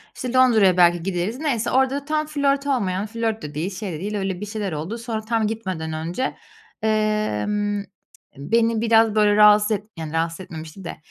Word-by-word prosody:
İşte, 250 -1 -5
Londra'ya 225 -8 +5
belki 175 -1 +4
gideriz. 195 +6 -2
Neyse, 255 -7 -1
orada 265 +2 +1
tam 310 0 0
flört 280 -1 0
olmayan, 200 -7 0
flört 225 0 -2
de 150 -1 -7
değil, 165 +5 -2
şey 195 -6 -4
de 155 - -5
değil, 210 +3 -4
öyle 195 -2 -3
bir - - -3
şeyler 210 -2 -4
oldu, 160 +9 -4
sonra 230 -2 -4
tam 220 0 0
gitmeden 185 -8 -4
önce, 170 +11 -3 0.5
eee, 215 - +1 0.9
beni 225 +8 +1
biraz, 225 -1 +4
böyle, 210 -1 +4
rahatsız 210 0 +6
et 210 -1 0
yani, 160 -1 -6
rahatsız 165 +1 -1
etmemişti 160 0 -9
de 170 - -6
210 Hz, 180 wpm, -22 LUFS, 180-230 Hz, 0.9 s, rahatsız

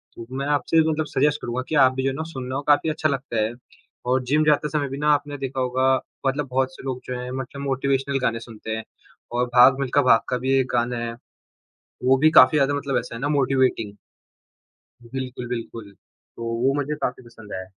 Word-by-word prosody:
तो 115 - -8
मैं 140 - -2
आपसे 160 +3 +2
मतलब 155 0 -1
सजेस्ट 150 0 +1
करूँगा 120 +1 -3
कि 160 - -1
आप 130 -3 +5
भी 130 - -2
जो 135 - +2
है 135 - -4
ना 160 - -3
सुनना 130 0 -5
वो 140 - -1
काफ़ी 150 +2 +4
अच्छा 155 0 0
लगता 135 -5 -2
है 110 +2 -2 0.6
और 130 +1 +2
जिम 150 +5 +2
जाते 150 0 +3
समय 145 -1 -1
भी 135 - -5
ना 150 +1 +1
आपने 145 0 -2
देखा 135 -1 -4
होगा 130 +1 +1 0.4
मतलब 140 +1 -1
बहुत 130 0 0
से - - -12
लोग 130 -1 -4
जो 125 -1 -4
है 125 0 -6
मतलब 130 +2 -6
मोटिवेशनल 135 0 0
गाने 115 -2 0
सुनते 115 -1 -9
हैं 110 - -5 0.5
और 120 +1 +1
भाग 130 +2 +7
मिल्खा 140 +1 +2
भाग 125 -4 +5
का 125 - 0
भी 130 +2 -2
एक 130 - 0
गाना 120 0 0
है, 115 0 -3 0.9
वो 130 +1 +5
भी 155 +3 +5
काफ़ी 150 -1 +7
ज़्यादा 145 0 +2
मतलब 140 -1 -1
ऐसा - - -6
है 115 - -6
ना 140 - -1
मोटिवेटिंग। 130 -7 +1 1.2
बिल्कुल, 125 -2 -5
बिल्कुल, 115 -3 -6 0.4
तो 115 - -7 0.2
वो 135 +1 +3
मुझे 145 +1 -2
काफ़ी - - -3
पसंद 115 -3 -13
है। 95 0 -4
130 Hz, 215 wpm, -23 LUFS, 125-140 Hz, 1.2 s, भाग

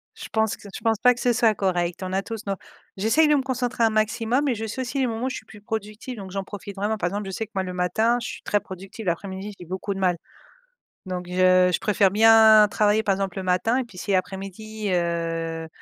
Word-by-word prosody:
je - - -8
pense 220 -1 +1
que - - -21
c 205 - -10
je - - -6
pense 225 -2 +1
pas 250 0 +6
que - - -10
ce 245 -1 +2
soit 225 -2 +3
correct 180 -2 -1
on 185 0 -4
a 190 - +1
tous 225 +1 -7
nos 200 - -1 0.4
j'essaye 225 +11 +3
de 300 - +4
me 280 - +2
concentrer 250 -2 -1
un 225 - +5
maximum 225 +5 +1
et 265 - +2
je 225 -1 -4
sais 260 +5 -4
aussi 260 +2 -3
les 260 - +2
moments 230 +1 -3
où - - 0
je - - -5
suis - - -11
plus 210 - -14
productive 215 +3 -5
donc 195 -2 -8
j'en 195 0 -3
profite 200 0 -8
vraiment. 205 +2 -1
Par 180 - -1
exemple, 205 +3 -3
je 190 - -5
sais 220 +4 -3
que - - -45
moi 190 - 0
le 180 -1 -5
matin 200 +7 +1
je 245 - -4
suis - - -7
très 205 - +1
productive 190 +2 -9
l'après-midi 190 +4 -3
j'ai 175 - -9
beaucoup 190 +3 -4
de 195 - -5
mal, 180 -2 +2 0.9
donc 180 -1 -4
je 185 0 +4
je - - +1
préfère 200 -2 +3
bien 220 0 +7
travailler, 210 +1 +2
par 200 -3 +2
exemple, 195 -1 -3
le 190 - -4
matin 185 +7 +2
et 260 - -1
puis 235 -6 -16
si 195 +2 -1
après-midi, 195 +3 -3
heu 165 -2 -1
205 Hz, 260 wpm, -24 LUFS, 185-225 Hz, 0.9 s, bien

